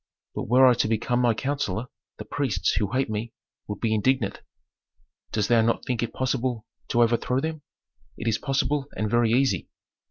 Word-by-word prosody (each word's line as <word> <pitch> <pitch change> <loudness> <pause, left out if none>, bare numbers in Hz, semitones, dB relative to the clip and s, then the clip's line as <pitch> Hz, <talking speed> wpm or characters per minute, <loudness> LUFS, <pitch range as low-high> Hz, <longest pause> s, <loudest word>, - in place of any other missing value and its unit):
But - - -4
were 130 +4 +6
I 125 - +7
to 115 - +1
become 120 +3 0
thy 120 -2 +3
counsellor, 125 -5 -2 0.3
the - - -7
priests, 140 -6 0
who 105 -2 -1
hate 130 +2 +1
me, 110 +2 -4 0.3
would 105 -1 -5
be 115 -2 +1
indignant." 110 0 +1 0.9
"Dost 105 -2 0
thou 115 -1 +4
not 115 +1 0
think 125 -2 -1
it 120 - -2
possible 125 -3 -1 0.2
to 120 - +3
overthrow 120 +2 +1
them?" 160 +1 -3 0.6
"It 115 - -5
is 110 -1 +1
possible 135 0 0
and 105 -1 -1
very 120 -1 +3
easy." 125 - +1
120 Hz, 180 wpm, -25 LUFS, 110-130 Hz, 0.9 s, I